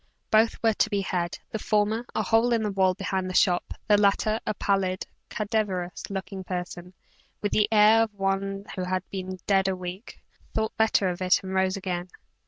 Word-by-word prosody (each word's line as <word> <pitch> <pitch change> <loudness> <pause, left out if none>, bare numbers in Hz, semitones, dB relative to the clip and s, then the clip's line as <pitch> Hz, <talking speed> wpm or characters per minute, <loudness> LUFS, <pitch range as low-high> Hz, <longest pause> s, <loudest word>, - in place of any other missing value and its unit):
Both 220 +1 +4
were 225 -1 +4
to 215 - +1
be 200 -2 0
had; 175 -2 -2
the 220 - -3
former, 215 +3 0
a - - +1
hole 230 +2 +3
in 225 -1 +1
the 210 - -1
wall 190 -1 +2
behind 190 -1 -2
the 185 - -5
shop; 180 -1 +3 0.2
the 205 -1 +5
latter, 210 +2 +2
a - - 0
pallid, 195 -1 0 0.2
cadaverous 205 -5 -2
looking 195 0 -5
person, 180 0 -6 0.5
with 205 - 0
the 210 0 +2
air 215 +1 +6
of 225 -2 0
one 195 0 -1
who 185 -2 -3
had 185 0 -2
been 185 -1 -5
dead 195 -1 +3
a 190 - 0
week, 185 +4 -8 0.4
thought 220 0 -1
better 220 -3 +3
of 180 0 -3
it 185 +1 +3
and 190 0 -5
rose 190 0 +1
again. 180 -2 -4
195 Hz, 190 wpm, -26 LUFS, 185-215 Hz, 0.5 s, air